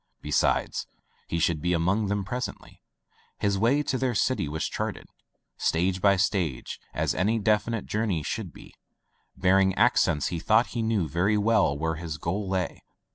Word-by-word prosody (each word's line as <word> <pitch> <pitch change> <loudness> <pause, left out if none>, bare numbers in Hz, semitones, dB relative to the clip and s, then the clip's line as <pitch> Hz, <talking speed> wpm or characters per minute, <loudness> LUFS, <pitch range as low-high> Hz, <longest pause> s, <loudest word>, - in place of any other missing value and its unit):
Besides, 75 -1 0 0.4
he 85 - -2
should 80 -1 +1
be 90 +1 +1
among 90 +6 +1
them 100 -1 -1
pres 125 +4 -2
ently. - - -14 0.6
His 100 -1 0
way 130 +7 +3
to 130 -3 -1
their 130 -3 0
city 130 - +1
was 80 +1 -2
charted, - - -4 0.5
stage 90 +3 0
by 100 0 +5
stage, 90 - -1
as - - 0
any 105 +6 +1
definite 110 +1 0
journey 105 -7 -1
should 95 +4 -4
be. - - -14 0.6
Barring 95 0 +3
accidents, 95 - +3
he 85 - -3
thought 110 +7 +3
he 120 - -1
knew 110 -6 0
very 90 +8 +1
well 105 -9 +2
where 80 +1 -2
his 80 -2 -5
goal 95 +5 -3
lay. 95 -2 -2
95 Hz, 165 wpm, -27 LUFS, 85-110 Hz, 0.6 s, by